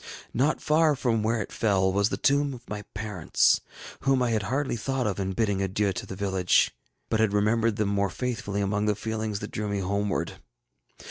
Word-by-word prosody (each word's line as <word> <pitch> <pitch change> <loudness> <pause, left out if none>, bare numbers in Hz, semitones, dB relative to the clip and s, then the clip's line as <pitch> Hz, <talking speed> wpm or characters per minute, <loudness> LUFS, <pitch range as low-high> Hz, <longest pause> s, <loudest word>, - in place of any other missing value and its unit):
Not 140 +6 +2
far 155 0 +4
from 120 -4 0
where 110 +1 +1
it - - -13
fell 95 -3 +2
was 100 +1 +2
the - - -2
tomb 140 -1 +2
of 120 0 -14
my 105 0 -5
parents, 100 -5 +2 0.4
whom 135 -2 +2
I 120 - +1
had 110 -2 +1
hardly 130 +6 -1
thought 130 +2 -2
of 100 -2 -1
in 95 0 -1
bidding 100 -2 0
adieu 95 +1 0
to 90 - -5
the 95 - -6
village, 95 -2 +2 0.4
but 110 - 0
had 110 -2 +2
remembered 110 +2 +2
them 105 -1 0
more 100 -1 +1
faithfully 105 -1 -3
among 100 +1 0
the 105 - +2
feelings 110 -1 -3
that 105 - -6
drew 105 0 -3
me 100 - -1
homeward. 100 +1 -2
105 Hz, 200 wpm, -27 LUFS, 100-115 Hz, 0.4 s, far